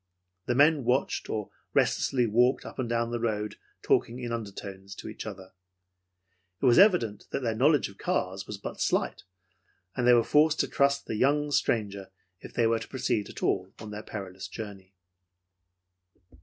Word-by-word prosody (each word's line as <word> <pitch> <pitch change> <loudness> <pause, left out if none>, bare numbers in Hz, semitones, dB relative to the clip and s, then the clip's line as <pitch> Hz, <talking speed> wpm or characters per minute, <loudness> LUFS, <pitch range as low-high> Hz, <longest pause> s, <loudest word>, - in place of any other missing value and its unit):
The 120 - +1
men 145 +1 +5
watched 125 +3 0
or 105 -2 -3 0.2
restlessly 125 -3 +2
walked 120 +4 +2
up - - -9
and 125 -3 -1
down 115 0 0
the 120 - -2
road 105 -2 -2 0.3
talking 120 - +2
in 120 -2 -4
undertones 100 -3 -6
to - - -9
each - - -7
other. 95 -2 -9 1.1
It - - -1
was 125 +3 +6
evident 180 - +4
that - - -2
their 115 -2 0
knowledge 140 +5 +3
of 100 - -15
cars 95 +1 -2
was 105 - -5
but 100 - -7
slight, - - 0 0.7
and 125 -1 0
they 125 - +8
were 120 -1 +5
forced 155 +4 +3
to - - -1
trust 140 0 +2
to - - -27
the 110 - -2
young 145 +2 +2
stranger 100 -7 0 0.3
if - - -11
they 115 - +3
were 115 0 +2
to - - -8
proceed 125 -5 -1
at - - -9
all 95 0 0
on 110 -1 -9
their 105 0 -6
perilous 95 -3 -7
journey. 100 -3 -9
115 Hz, 180 wpm, -28 LUFS, 100-130 Hz, 1.1 s, they